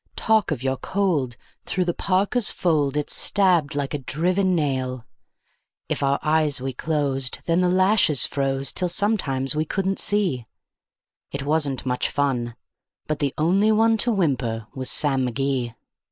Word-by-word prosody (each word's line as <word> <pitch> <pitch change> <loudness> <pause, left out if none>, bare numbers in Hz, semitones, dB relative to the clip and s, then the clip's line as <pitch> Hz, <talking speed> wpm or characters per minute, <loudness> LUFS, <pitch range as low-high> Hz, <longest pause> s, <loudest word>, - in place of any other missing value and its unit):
Talk 220 -2 +2
of 140 -6 -3
your 135 0 0
cold! 165 -12 -1 0.3
through 180 0 -1
the 175 - 0
parka's 200 +6 0
fold 150 -5 0
it 150 - -2
stabbed 175 -7 +2
like 140 -1 -2
a 145 - -2
driven 180 +7 +1
nail. 130 -5 -2 0.8
If - - -2
our 140 0 +2
eyes 155 -2 +1
we'd 130 -1 -5
close, 140 -4 0 0.2
then 170 +1 +2
the 180 - +2
lashes 185 - +3
froze 135 -1 -1
till 180 - 0
sometimes 150 - 0
we 155 - +1
couldn't 195 +4 -2
see; 180 - 0 0.8
It 140 -1 -4
wasn't 145 -4 0
much 125 -1 0
fun, 125 -5 -1 0.5
but 155 -1 -3
the 140 -3 -1
only 190 +7 +3
one 225 +1 +4
to 235 +3 +3
whimper 130 - -1
was 130 -1 -1
Sam 135 -3 +1
McGee. 125 -2 -2
150 Hz, 155 wpm, -23 LUFS, 135-185 Hz, 0.8 s, one